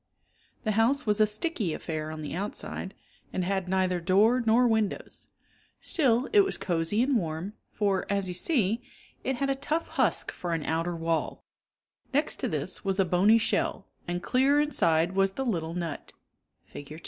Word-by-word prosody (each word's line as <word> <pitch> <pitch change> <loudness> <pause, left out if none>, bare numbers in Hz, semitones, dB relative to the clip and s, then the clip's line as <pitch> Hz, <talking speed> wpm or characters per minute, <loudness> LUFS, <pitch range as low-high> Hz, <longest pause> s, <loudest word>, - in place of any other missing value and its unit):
The 215 - 0
house 235 +7 +3
was 210 0 +2
a 215 - +6
sticky 215 - -2
affair 155 -2 -4
on 155 0 -6
the 150 - -5
outside 195 +1 -5 0.4
and 185 - -2
had 190 -1 -1
neither 185 -1 +1
door 210 +8 +4
nor 235 +2 +4
windows. 220 -3 -2 0.5
Still 260 -5 +2
it 420 - +7
was 390 -1 +2
cosy 175 +5 0
and 265 -1 +2
warm 165 +1 -3 0.2
for, 200 -3 0
as 200 -1 0
you 180 - -3
see, 225 - 0 0.4
it 265 - -1
had 275 +2 0
a - - +3
tough 300 +4 -2
husk - - 0
for 175 -2 -3
an 160 - -3
outer 165 +2 -1
wall; 165 -1 -2 0.7
next 295 +2 +2
to - - -1
this 155 +4 -1
was 195 0 -1
a 195 - +4
bony 190 +6 +4
shell, 225 - 0 0.2
and 175 0 -3
clear 275 +3 +3
inside 170 - +2
was 195 0 +1
the 270 - -3
little 165 -7 -2
nut 170 -3 -5 0.5
(Fig. 150 +2 -10
195 Hz, 170 wpm, -28 LUFS, 175-235 Hz, 0.7 s, it